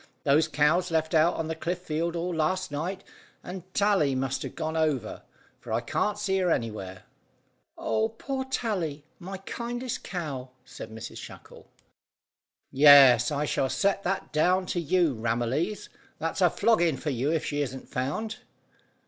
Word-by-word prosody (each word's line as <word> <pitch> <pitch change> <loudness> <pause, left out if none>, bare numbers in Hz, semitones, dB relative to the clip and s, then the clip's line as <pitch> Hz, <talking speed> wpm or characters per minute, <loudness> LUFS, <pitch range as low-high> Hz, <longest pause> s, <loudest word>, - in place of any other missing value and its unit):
Those 150 +3 +4
cows 155 +5 +2
left 160 -1 0
out 160 +2 +4
on 160 - -3
the 160 - -2
cliff 170 +2 -3
field 170 -1 -2
all 175 +1 -2
last 175 +2 0
night, 180 +7 -3 0.4
and 185 0 -8
Tally 195 -10 +3
must 135 0 -1
have - - -6
gone 160 +1 -3
over, 150 -9 -1 0.4
for 115 - -10
I 110 - +2
can't 205 - -1
see 195 -2 0
her 180 -1 +1
anywhere." 105 - -3 0.7
"Oh, 220 0 0
poor 265 +4 -4
Tally! 180 - -2
My 190 +2 -6
kindest 240 +5 -5
cow," 140 -8 -5 0.2
cried - - -9
Mrs 110 0 -8
Shackle. - - -12 1.0
"Yes, 135 -4 +8
I 150 0 -1
shall 135 -2 0
set 200 +5 +1
that 195 -3 -3
down 180 +5 +3
to 175 - -1
you 170 -1 +2
Ramillies. 120 - -1 0.3
That's - - -3
a - - +6
flogging 175 -10 +2
for 150 - -3
you 135 +4 0
if 160 -2 0
she 145 0 -1
isn't 130 -2 -5
found." 150 - -3
160 Hz, 155 wpm, -27 LUFS, 140-185 Hz, 1.0 s, Yes